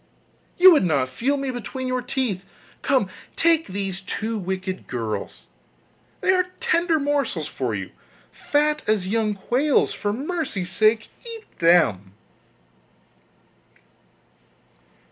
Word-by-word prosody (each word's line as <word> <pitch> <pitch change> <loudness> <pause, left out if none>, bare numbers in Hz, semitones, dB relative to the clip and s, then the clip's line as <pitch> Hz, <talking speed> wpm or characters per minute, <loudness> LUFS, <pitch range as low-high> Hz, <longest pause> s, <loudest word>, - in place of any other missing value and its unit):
you 370 +1 +9
would 300 - +4
not 145 -7 +1
feel 265 - 0
me 275 -1 -2
between 255 +2 -5
your 255 0 -1
teeth. 245 -7 -2 0.4
Come, 260 -8 +2 0.3
take 325 -1 +3
these 195 0 -4
two 220 +3 -3
wicked 185 0 -4
girls, 115 -4 -4 0.8
they - - +3
are 365 -1 +2
tender 345 -9 +2
morsels 280 - 0
for 125 -5 -3
you, 95 -2 -5 0.4
fat 300 +1 0
as 210 -4 +1
young 215 0 0
quails; 255 +8 +1
for 205 - -2
mercy's 265 - -3
sake 220 +3 +2
eat 460 -2 -8
them! 105 - +3
225 Hz, 115 wpm, -23 LUFS, 185-290 Hz, 0.8 s, you